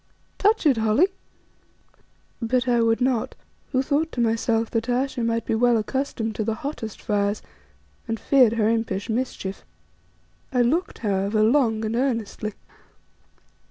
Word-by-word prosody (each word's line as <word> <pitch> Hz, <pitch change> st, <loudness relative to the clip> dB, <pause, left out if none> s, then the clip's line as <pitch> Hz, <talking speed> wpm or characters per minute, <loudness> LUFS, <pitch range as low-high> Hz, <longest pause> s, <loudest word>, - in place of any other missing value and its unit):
Touch 420 Hz, -2 st, +3 dB
it, 275 Hz, -6 st, +4 dB
Holly." 220 Hz, -, +3 dB, 1.3 s
But 245 Hz, +2 st, 0 dB
I 240 Hz, -1 st, +3 dB
would 225 Hz, +1 st, +2 dB
not, 250 Hz, -3 st, 0 dB, 0.4 s
who 260 Hz, -1 st, +1 dB
thought 305 Hz, +4 st, 0 dB
to -, -, -4 dB
myself 225 Hz, 0 st, +1 dB
that 225 Hz, +1 st, -1 dB
Ayesha 255 Hz, 0 st, 0 dB
might 230 Hz, 0 st, 0 dB
be -, -, -1 dB
well 240 Hz, +1 st, +3 dB
accustomed 225 Hz, -1 st, -2 dB
to 220 Hz, -, 0 dB
the 220 Hz, +1 st, -1 dB
hottest 225 Hz, -4 st, -6 dB
fires, 205 Hz, 0 st, -1 dB, 0.6 s
and 225 Hz, -1 st, -2 dB
feared 255 Hz, -5 st, +4 dB
her 220 Hz, -2 st, +1 dB
impish 225 Hz, -2 st, -1 dB
mischief. 220 Hz, -5 st, -3 dB, 0.9 s
I 250 Hz, -2 st, +3 dB
looked, 325 Hz, +10 st, 0 dB
however, 200 Hz, +2 st, +1 dB
long 225 Hz, -2 st, +2 dB
and 220 Hz, +1 st, -2 dB
earnestly. 230 Hz, -4 st, -1 dB
230 Hz, 140 wpm, -24 LUFS, 220-255 Hz, 1.3 s, it